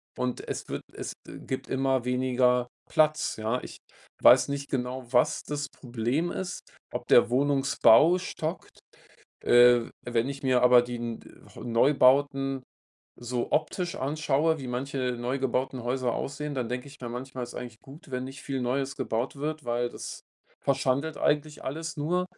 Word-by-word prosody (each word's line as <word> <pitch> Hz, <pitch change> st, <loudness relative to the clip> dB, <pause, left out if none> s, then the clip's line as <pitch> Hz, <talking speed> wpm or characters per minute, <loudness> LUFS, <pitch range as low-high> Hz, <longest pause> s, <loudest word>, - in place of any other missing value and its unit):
und 125 Hz, -1 st, -3 dB
es -, -, -5 dB
wird -, -, -4 dB
es -, -, -6 dB
e -, -, -9 dB
gibt 130 Hz, -, -5 dB
immer 130 Hz, -2 st, 0 dB
weniger 125 Hz, -1 st, +2 dB, 0.2 s
Platz, 155 Hz, -4 st, +2 dB
ja? 110 Hz, +3 st, -1 dB
Ich -, -, -9 dB, 0.4 s
weiß 125 Hz, +2 st, +7 dB
nicht 140 Hz, 0 st, -4 dB
genau, 125 Hz, -1 st, -3 dB
was 125 Hz, -1 st, +3 dB
das 145 Hz, -1 st, -3 dB
Problem 125 Hz, +7 st, -2 dB
ist, 185 Hz, -1 st, -4 dB, 0.3 s
ob -, -, -4 dB
der 120 Hz, -, +6 dB
Wohnungsbau 140 Hz, +3 st, +5 dB
stockt. 170 Hz, -1 st, -5 dB, 0.6 s
Äh, 120 Hz, -1 st, +6 dB
wenn 120 Hz, +1 st, 0 dB
ich 140 Hz, +1 st, -7 dB
mir 130 Hz, -2 st, +3 dB
aber 125 Hz, 0 st, +7 dB
die 120 Hz, 0 st, -5 dB
n 115 Hz, -1 st, -4 dB
de -, -, -16 dB, 0.2 s
heu -, -, -9 dB
Neubauten 135 Hz, +2 st, +3 dB, 0.6 s
so 120 Hz, 0 st, -3 dB
optisch 180 Hz, 0 st, 0 dB
anschaue, 155 Hz, +2 st, +1 dB
wie 135 Hz, -, -6 dB
manche 130 Hz, 0 st, -2 dB
neu 125 Hz, +3 st, -2 dB
gebauten 130 Hz, -1 st, -1 dB
Häuser 125 Hz, 0 st, -1 dB
aussehen, 145 Hz, +1 st, -4 dB
dann 125 Hz, -4 st, -2 dB
denke 125 Hz, +2 st, -3 dB
ich 140 Hz, -1 st, -14 dB
mir 120 Hz, -2 st, -5 dB
manchmal, 130 Hz, +1 st, -5 dB
ist -, -, -11 dB
eigentlich 120 Hz, -3 st, -7 dB
gut, 140 Hz, +2 st, -14 dB
wenn 125 Hz, 0 st, -3 dB
nicht 135 Hz, +1 st, -8 dB
viel 135 Hz, -2 st, -3 dB
Neues 135 Hz, +2 st, -1 dB
gebaut 130 Hz, 0 st, -2 dB
wird, 155 Hz, +1 st, -4 dB
weil 120 Hz, 0 st, 0 dB
das -, -, -8 dB, 0.4 s
verschandelt 140 Hz, +3 st, 0 dB
eigentlich 150 Hz, 0 st, 0 dB
alles 160 Hz, +3 st, -5 dB
nur. 180 Hz, +5 st, 0 dB
130 Hz, 165 wpm, -28 LUFS, 125-145 Hz, 0.6 s, weiß